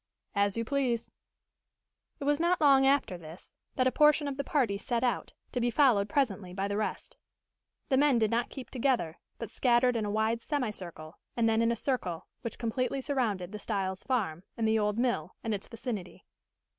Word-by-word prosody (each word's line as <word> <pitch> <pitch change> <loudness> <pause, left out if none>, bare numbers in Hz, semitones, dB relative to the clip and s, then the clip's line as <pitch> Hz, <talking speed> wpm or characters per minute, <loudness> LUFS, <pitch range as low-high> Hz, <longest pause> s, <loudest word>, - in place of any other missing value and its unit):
"As 200 0 +1
you 230 - -1
please." 255 -3 0 1.1
It - - -5
was 290 +1 +2
not 345 +1 +2
long 275 -3 +6
after 270 -10 +2
this 160 +2 -11 0.2
that 255 - +2
a 260 - +4
portion 300 0 +4
of 280 - -3
the 280 - -2
party 240 -10 +1
set 240 +2 -1
out, 245 -2 -1 0.2
to 245 - -1
be 240 - +2
followed 235 -6 +4
presently 200 -10 0
by 195 +1 -1
the 200 - -2
rest. 215 +1 -3 0.7
The 265 - +3
men 285 -2 +4
did 220 -2 +2
not 235 +3 +1
keep 260 -4 -9
together, 245 - 0 0.2
but 230 - -6
scattered 250 0 +3
in 225 - 0
a - - -2
wide 220 +2 +1
semicircle, 195 - -4 0.2
and 230 -1 +3
then 225 0 +3
in 230 0 +3
a - - +1
circle, 210 - -2 0.2
which 230 - -5
completely 255 +3 -1
surrounded 220 -10 -1
the 210 - -6
Styles' 190 -3 -2
farm, 195 - -1 0.2
and 225 -1 +1
the 220 0 +3
old 210 0 0
mill, 235 -9 0
and 225 - -1
its 200 -1 -4
vicinity. 225 -5 -6
230 Hz, 195 wpm, -30 LUFS, 200-265 Hz, 1.1 s, long